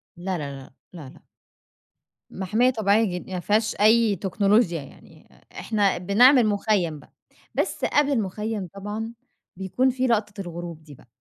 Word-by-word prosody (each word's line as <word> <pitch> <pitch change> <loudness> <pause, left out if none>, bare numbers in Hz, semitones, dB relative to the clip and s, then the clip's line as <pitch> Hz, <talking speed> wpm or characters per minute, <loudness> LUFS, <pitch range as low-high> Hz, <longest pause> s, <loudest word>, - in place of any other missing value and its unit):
لا، 180 +1 -3
لا، 145 -3 -5
لا، 130 - -16 0.2
لأ، 155 -7 -10
لأ. - - -19 1.0
محمية 215 +7 +1
طبيعية 220 -2 +2
جدًا، 180 -4 -3
يعني - - -7
ما 180 - -2
فيهاش 215 +4 0
أي 220 0 +4
تكنولوجيا 195 -1 +1
يعني، 135 - -17 0.3
إحنا 205 -3 +1
بنعمل 240 +8 +5
مخيّم 200 -6 0
بقى، - - -20 0.4
بس - - -1
قبل 290 -1 +2
المخيّم 215 -3 -2
طبعًا، 210 +3 -6 0.4
بيكون 195 +8 0
في 260 0 -1
لقطة 210 -3 -1
الغروب 170 -2 -8
دي 150 -2 -14
بقى. 125 - -21
205 Hz, 150 wpm, -24 LUFS, 180-225 Hz, 1.0 s, بنعمل